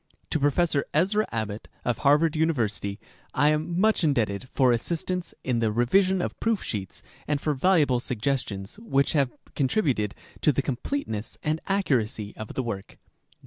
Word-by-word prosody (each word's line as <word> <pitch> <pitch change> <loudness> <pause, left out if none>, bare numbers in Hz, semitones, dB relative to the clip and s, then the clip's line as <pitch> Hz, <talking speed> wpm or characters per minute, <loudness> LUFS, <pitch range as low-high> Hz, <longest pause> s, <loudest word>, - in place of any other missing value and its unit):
To 160 - +1
Professor 145 +1 +2
Ezra 200 +7 +2
Abbot, 110 -2 -3 0.2
of 120 -1 0
Harvard 150 +3 +4
University, 115 -10 0 0.4
I 145 - +4
am 155 +3 0
much 215 -1 +3
indebted 120 -6 +1
for 130 -3 +4
assistance 170 +8 -1
in 125 -2 0
the 110 -2 +1
revision 185 - +3
of - - -4
proof 225 -2 0
sheets 95 -4 -5 0.2
and 150 -1 +1
for 150 +1 0
valuable 145 -4 +3
suggestions 120 - -2
which 140 -12 +1
have 140 -5 +2 0.2
contributed 130 - +1 0.3
to 150 - +5
the 140 0 0
completeness 125 - -3
and 155 +1 0
accuracy 120 - 0
of 110 - -8
the 130 - 0
work. 100 -5 -5
140 Hz, 150 wpm, -26 LUFS, 115-165 Hz, 0.4 s, to